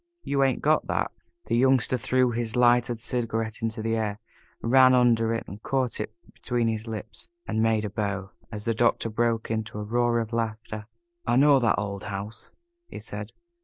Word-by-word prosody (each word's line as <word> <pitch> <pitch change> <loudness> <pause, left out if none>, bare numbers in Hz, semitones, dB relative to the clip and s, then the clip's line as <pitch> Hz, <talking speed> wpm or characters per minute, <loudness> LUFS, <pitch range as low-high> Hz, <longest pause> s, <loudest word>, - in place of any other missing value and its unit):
You 140 -1 +1
ain't 135 -2 +1
got 155 +1 +3
that!" - - -1 0.3
The - - 0
Youngster 130 0 +3
threw 130 0 +2
his 115 0 -3
lighted 120 -1 +3
cigarette 115 -2 -1
into 110 -1 -2
the 115 0 0
air, 105 -2 -1 0.4
ran 130 +2 +5
under 115 -2 +3
it, 115 - -2 0.2
caught 130 -2 -1
it 105 - -3 0.2
between 120 -2 -1
his 110 0 -2
lips, 110 0 -7 0.2
and 110 - -1
made 110 -1 +2
a - - -3
bow, 100 -1 -3 0.2
as 105 -2 -6
the 115 - +1
Doctor 115 0 +1
broke 115 0 0
into 110 -1 -3
a 105 - -3
roar 120 +2 +1
of 115 0 -4
laughter. 110 -2 -3 0.4
"I - - +3
know 140 +1 +6
that 120 -3 +2
old 100 -2 -4
house," 105 +2 -6 0.4
he - - -9
said. - - -6
115 Hz, 180 wpm, -26 LUFS, 110-120 Hz, 0.4 s, know